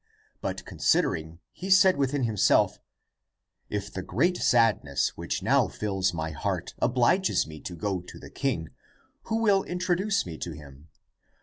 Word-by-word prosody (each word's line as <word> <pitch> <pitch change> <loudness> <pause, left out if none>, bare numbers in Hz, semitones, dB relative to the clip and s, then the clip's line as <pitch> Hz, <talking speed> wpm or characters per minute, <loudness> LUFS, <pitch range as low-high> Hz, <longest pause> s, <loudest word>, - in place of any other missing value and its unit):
But - - -4
considering 80 +2 0
he 190 - -7
said 190 -1 +6
within 140 0 0
himself, 110 -4 +3 0.5
" - - -52
If 100 - -10
the 95 - -4
great 155 - +1
sadness 75 - +2
which - - -4
now - - +3
fills 95 -3 -1
my 80 -2 -4
heart 75 - -3
obliges 130 +10 +2
me 80 -1 -10
to 90 - -7
go 95 +1 -2
to 90 - -12
the - - -12
king, 105 - -2 0.6
who 220 - -2
will 205 -4 +4
introduce 185 +3 0
me 80 -3 -7
to 85 - -5
him? 75 0 -13
105 Hz, 150 wpm, -27 LUFS, -, 0.6 s, said